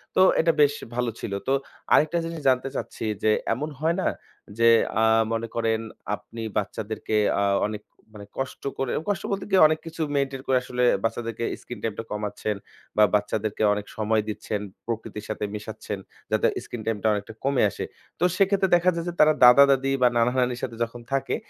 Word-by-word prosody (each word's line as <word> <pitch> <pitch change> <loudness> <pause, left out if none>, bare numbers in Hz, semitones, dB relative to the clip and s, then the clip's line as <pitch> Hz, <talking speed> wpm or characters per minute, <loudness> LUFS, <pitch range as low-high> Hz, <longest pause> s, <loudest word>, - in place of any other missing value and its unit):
তো - - +5 0.2
এটা 165 0 +4
বেশ 145 0 +5 0.2
ভালো 125 -1 0
ছিল। 100 - -5 0.2
তো 135 - +3 0.4
আরেকটা 155 +3 +4
জিনিস 165 -1 -5
জানতে 130 +1 +1
চাচ্ছি - - -4 0.2
যে 110 - +4 0.2
এমন 150 +4 -3
হয় 165 +2 +1
না - - 0 0.5
যে 115 0 +4 0.3
আ - - +4 0.3
মনে 115 0 -2
করেন 115 -1 +1 0.4
আপনি 115 +2 -10 0.2
বাচ্চাদেরকে 110 +1 -3 0.3
আ - - +2 0.2
অনেক 105 0 -6 0.3
মানে 100 - -9
কষ্ট 135 -1 -4
করে 135 -2 -1 0.2
কষ্ট 200 -1 -1
বলতে 195 0 -2
গিয়ে 190 -1 +5
অনেক 155 0 0
কিছু 165 0 -6
মেইনটেইন 135 -1 -1
করে 130 -1 +4
আসলে 125 0 -2 0.2
বাচ্চাদেরকে 115 0 -2 0.2
স্ক্রিন 120 -4 -8
টাইম 115 -2 -1
টা - - -3
কমাচ্ছেন 105 0 -3 0.4
বা 105 - +7
বাচ্চাদেরকে 105 +1 -1
অনেক 105 0 -4
সময় 110 0 +1
দিচ্ছেন, 105 0 -3 0.3
প্রকৃতির 110 -2 -5
সাথে 110 - -3
মেশাচ্ছেন 105 -1 -6 0.3
যাতে - - +3 0.2
স্ক্রিন 120 - -7
টাইম 115 -1 0
টা 110 - +3
অনেকটা 105 +2 -4
কমে 135 -3 +2
আসে। - - -5 0.3
তো - - -1
সেক্ষেত্রে 195 -1 +3
দেখা 175 +1 +3
যায় 170 - -3
যে - - -5
তারা 155 0 +6
দাদা-দাদি 135 +1 +6
বা 125 - +7
নানা-নানির 125 +1 +1
সাথে 120 - -3
যখন 120 +1 -6
থাকে 135 - 0
120 Hz, 180 wpm, -25 LUFS, 110-140 Hz, 0.5 s, বা